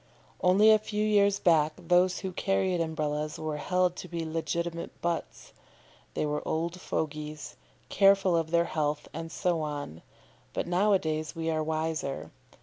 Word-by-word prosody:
Only 200 +4 +6
a 215 - +6
few 210 0 -2
years 200 -2 +4
back 155 -3 +3
those 180 +1 +2
who 190 - -3
carried 185 -1 0
Umbrellas 150 -2 -2
were 155 -1 -3
held 180 +3 +1
to - - -7
be 170 -2 -4
legitimate 170 +1 -3
butts. 170 -2 -4 0.6
They - - 0
were 150 0 -1
old 170 +3 -2
fogies, 150 0 -4 0.3
careful 195 -2 +4
of 165 -1 0
their 170 0 +3
health, 150 -2 -2
and 165 +1 -6
so 175 -2 0
on; 145 - -5 0.5
but - - -2
now 190 +4 +2
a - - +6
days 155 -1 -3
we 165 0 -1
are 155 0 0
wiser. 155 -3 -2
165 Hz, 155 wpm, -29 LUFS, 155-180 Hz, 0.6 s, Only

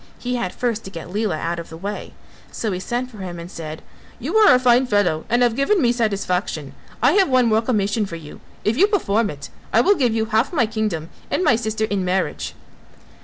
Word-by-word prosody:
He 250 0 -3
had 210 -7 -2
first 230 -3 -2
to - - -6
get 175 -1 -9
Lela 210 -5 0
out 170 +2 -2
of 170 - -8
the 160 - -9
way, 200 +4 -6 0.4
so 220 - -2
he 180 - -2
sent 245 +6 -3
for 215 - -12
him 180 -2 -6
and 170 +1 -8
said, 155 -1 -7 0.4
"You - - -4
are 420 -12 +7
a - - +3
fine 250 0 +4
fellow 195 -8 +1
and 240 +2 +3
have 235 -2 +2
given 275 - +2
me 240 -6 +3
satisfaction. 195 - -1 0.3
I 250 - +6
have 385 -1 +4
one 255 -1 +4
more 220 -1 +3
commission 210 -2 0
for 170 - -7
you, 155 -3 -10 0.2
if 215 - +1
you 390 +6 +6
perform 230 - +1
it 140 -4 -8 0.2
I 225 - +5
will 400 - +5
give 245 - +1
you 220 -1 +1
half 220 +3 +1
my 290 -9 +2
kingdom 215 -8 -3 0.2
and - - 0
my 295 -8 +5
sister 220 -1 -1
in 200 -3 -1
marriage." 185 +1 -1
220 Hz, 225 wpm, -21 LUFS, 185-245 Hz, 0.4 s, are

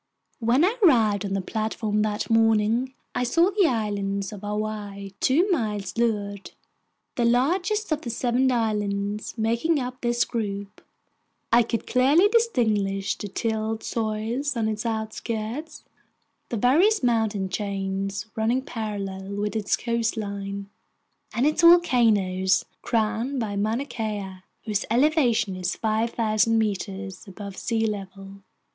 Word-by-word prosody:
When 245 +7 +3
I 435 +6 0
arrived 220 - +4
on 195 - -3
the 195 - 0
platform 215 +1 -1
that 210 0 -1
morning, 225 +3 +2 0.2
I - - 0
saw 335 +10 +3
the 395 -3 +3
Island 205 -4 -2
of 200 - -9
Hawaii 205 -1 -4
two 320 +9 +3
miles 210 - -1
to 235 - -2
leeward, 205 -3 -2 0.7
the 240 - +2
largest 355 - +1
of 310 - 0
the 240 - -5
seven 245 +2 +1
islands 210 -2 -1
making 235 +8 +1
up 250 0 -5
this 240 0 +1
group. 200 -4 -4 0.7
I 240 - +7
could 230 0 -2
clearly 280 +10 +4
distinguish 220 - +1
the 210 - -6
tilled 220 +1 -2
soil 220 +2 -2
on 225 -2 0
its 215 +1 -2
outskirts, 220 +5 -4 0.7
the 235 - -2
various 320 - +4
mountain 220 -5 +1
chains 195 +1 -3
running 230 +4 +1
parallel 200 -5 -5
with 205 +1 -2
its 210 -2 +1
coastline, 200 -4 -3 0.6
and 245 - 0
its 305 +3 +2
volcanoes, 220 - +4 0.2
crowned 230 +4 0
by 210 -3 -2
Mauna 220 +6 0
Kea, 210 -7 -4 0.3
whose 210 -2 0
elevation 240 - +2
is 185 -1 -2
5,000 225 0 +1
meters 195 -3 -3
above 200 0 -8
sea 225 +2 -1
level. 195 -2 -6
220 Hz, 130 wpm, -25 LUFS, 205-245 Hz, 0.7 s, I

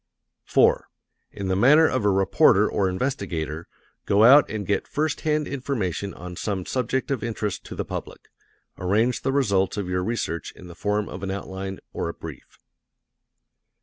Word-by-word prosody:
4. - - +3 0.4
In 100 - -5
the 95 - +1
manner 145 +10 +6
of 130 -4 -1
a 105 - +3
reporter 95 -1 +4
or 95 -2 0
investigator, 90 - -3 0.4
go 100 +2 +4
out 140 +5 +7
and 105 -2 -4
get 100 0 -1
first 155 0 -1
hand 150 -1 0
information 115 - -3
on 90 0 -8
some 95 -1 -3
subject 130 +2 -1
of 135 - -1
interest 110 -3 -3
to - - -8
the - - -3
public. - - -7 0.5
Arrange 110 +7 +1
the 135 - 0
results 100 -9 +1
of 100 -3 -2
your 90 0 -1
research 90 -6 -3
in - - -13
the 90 - -10
form 105 +4 -1
of 90 - -8
an 95 - -4
outline, 95 0 -5 0.2
or 85 - -2
brief. 80 -5 -11
100 Hz, 165 wpm, -24 LUFS, 95-125 Hz, 0.5 s, out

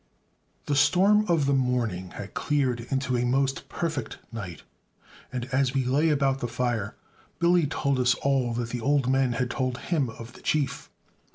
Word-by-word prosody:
The 145 - 0
storm 185 +9 +4
of 165 -5 +2
the 140 - +2
morning 120 -9 0
had 100 - -7
cleared 130 -5 0
into 135 -1 0
a 120 - +1
most 135 +2 0
perfect 155 -8 -3
night; 95 - -7 0.7
and, 125 -1 -3
as 130 0 +1
we 135 -2 +1
lay 145 +6 +2
about 135 -2 +2
the 120 - -2
fire, 120 -3 -2 0.4
Billy 170 -2 +3
told 140 -2 0
us 125 0 +3
all 135 -3 +1
that 120 -1 -2
the 120 0 -4
old 140 0 +2
men 130 -1 +2
had 125 +1 -1
told 130 -1 -1
him 145 -4 -1
of 115 +1 -10
the - - -15
Chief. 145 -4 -1
130 Hz, 175 wpm, -26 LUFS, 120-140 Hz, 0.7 s, storm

